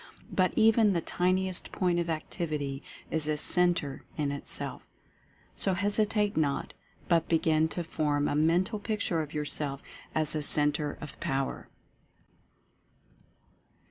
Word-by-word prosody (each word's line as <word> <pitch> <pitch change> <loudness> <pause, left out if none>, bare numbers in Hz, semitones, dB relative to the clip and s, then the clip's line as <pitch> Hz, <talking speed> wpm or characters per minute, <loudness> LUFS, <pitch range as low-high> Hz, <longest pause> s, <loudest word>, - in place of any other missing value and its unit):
But 185 -1 +2
even 220 -2 +4
the 170 - +1
tiniest. 185 +2 0
Point 180 -2 0
of 170 -1 -2
Activity 155 -4 -3 0.3
is 155 -2 +2
a 155 0 0
Centre 175 -4 +3
in 145 -2 -1
Itself. 140 - -5 0.7
So 190 - 0
hesitate 205 +2 +1
not, 145 -3 -1 0.3
but 170 -2 +2
begin 160 -1 +2
to 175 +2 -4
form 145 -3 -1
a - - -1
Mental 175 +8 +1
Picture 205 -6 -1
of 150 -1 -7
yourself 145 -2 -3 0.3
as 155 -2 +2
a 155 - -1
CEN 150 0 +7
TRE 150 0 -4
OF 150 - -9
POWER. 135 0 -3
160 Hz, 130 wpm, -29 LUFS, 150-185 Hz, 0.7 s, CEN